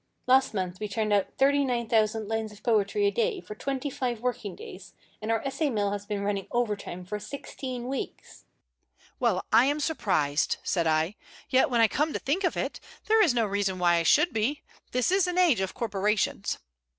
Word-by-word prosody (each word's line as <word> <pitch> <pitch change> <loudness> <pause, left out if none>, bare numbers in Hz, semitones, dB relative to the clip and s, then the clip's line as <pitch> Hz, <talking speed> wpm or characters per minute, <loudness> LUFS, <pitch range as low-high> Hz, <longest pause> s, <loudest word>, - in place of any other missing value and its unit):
Last 260 -2 +4
month 185 -2 -3
we 210 - -3
turned 210 +1 -1
out 200 -2 +3
39,000 235 -6 +2
lines 220 0 -2
of 210 0 -16
poetry 235 - +2
a 405 - +3
day 465 -3 0
for 210 - -9
twenty 270 +5 -3
five 245 -3 -2
working 230 -6 -3
days, 190 +1 -11 0.3
and 215 - -4
our 225 - 0
essay 285 +2 0
mill 205 -5 0
has 205 0 -5
been 205 -1 -2
running 200 -1 -2
over 240 -3 0
time 180 -2 -8
for 210 +3 -4
sixteen 250 +1 -6
weeks." 270 +1 -6 0.8
"Well, 225 -7 +1
I 240 - +7
am 290 +2 +1
surprised!" 160 - 0
said 170 -3 0
I. 160 +5 +1 0.3
"Yet, 260 +1 +4
when 240 -2 +2
I 225 - +7
come 300 +7 0
to - - -2
think 330 +9 -1
of 360 - 0
it, - - -3 0.3
there 445 0 +4
is 320 - +4
no 230 -2 +3
reason 200 -2 -1
why 175 -1 +3
I - - +2
should 310 - +4
be. 230 +7 -1 0.3
This 250 +5 +1
is 380 -1 +3
an 360 0 -2
age 340 - +4
of 190 - -3
corporations." 210 -3 0
225 Hz, 200 wpm, -27 LUFS, 200-270 Hz, 0.8 s, I